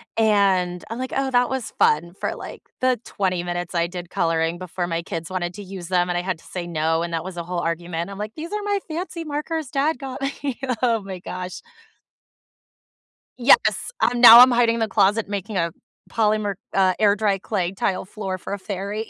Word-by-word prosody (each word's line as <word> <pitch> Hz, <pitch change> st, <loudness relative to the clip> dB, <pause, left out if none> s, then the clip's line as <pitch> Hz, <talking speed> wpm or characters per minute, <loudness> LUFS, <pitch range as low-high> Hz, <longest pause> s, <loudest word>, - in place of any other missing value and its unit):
and 195 Hz, -5 st, +2 dB
I'm 230 Hz, +2 st, -5 dB
like, 260 Hz, 0 st, -4 dB
"Oh, 270 Hz, -1 st, 0 dB
that 245 Hz, 0 st, +3 dB
was 265 Hz, -3 st, -3 dB
fun," 170 Hz, +4 st, +2 dB
for, -, -, -2 dB
like, -, -, -9 dB, 0.2 s
the 255 Hz, -3 st, +2 dB
20 185 Hz, -3 st, -1 dB
minutes 175 Hz, 0 st, -4 dB
I 170 Hz, 0 st, +1 dB
did 175 Hz, -1 st, -7 dB
coloring 165 Hz, +1 st, 0 dB
before 180 Hz, 0 st, -4 dB
my 165 Hz, 0 st, -2 dB
kids 165 Hz, -2 st, -6 dB
wanted 180 Hz, -1 st, -3 dB
to 205 Hz, -, -8 dB
use 185 Hz, -2 st, -8 dB
them, 180 Hz, -1 st, +2 dB
and 175 Hz, -, 0 dB
I -, -, 0 dB
had 185 Hz, -2 st, -2 dB
to -, -, -21 dB
say 175 Hz, -2 st, -5 dB
no, 160 Hz, 0 st, 0 dB
and 170 Hz, 0 st, -4 dB
that 165 Hz, -, -1 dB
was 185 Hz, -1 st, -7 dB
a 170 Hz, -, -3 dB
whole 175 Hz, 0 st, -3 dB
argument. 170 Hz, +1 st, -3 dB
I'm 195 Hz, -, -8 dB
like, 215 Hz, +1 st, -5 dB
"These 325 Hz, +4 st, -7 dB
are 420 Hz, -, -1 dB
my 405 Hz, -1 st, 0 dB
fancy 335 Hz, +1 st, -5 dB
markers 300 Hz, -1 st, -3 dB
dad 295 Hz, +3 st, +1 dB
got 270 Hz, -1 st, -7 dB
me." 275 Hz, -1 st, -3 dB, 0.2 s
Oh 230 Hz, -3 st, +2 dB
my 190 Hz, -1 st, -7 dB
gosh. 180 Hz, 0 st, -6 dB, 1.8 s
Yes, 380 Hz, -, +4 dB
I'm 240 Hz, +1 st, +2 dB
now 235 Hz, 0 st, +12 dB
I'm 255 Hz, -, +9 dB
hiding 235 Hz, -1 st, +3 dB
in 230 Hz, -, -3 dB
the 220 Hz, -, +1 dB
closet 205 Hz, +1 st, +2 dB
making 205 Hz, 0 st, -4 dB
a 170 Hz, -1 st, +1 dB, 0.4 s
polymer 215 Hz, -2 st, +1 dB, 0.2 s
uh, 185 Hz, -2 st, +3 dB
air 205 Hz, -2 st, +4 dB
dry 205 Hz, -2 st, +1 dB
clay 185 Hz, -3 st, -2 dB
tile 190 Hz, -1 st, -1 dB
floor 190 Hz, -2 st, -5 dB
for -, -, -7 dB
a 200 Hz, -, -2 dB
fairy. 200 Hz, +3 st, -4 dB
195 Hz, 210 wpm, -23 LUFS, 175-235 Hz, 1.8 s, now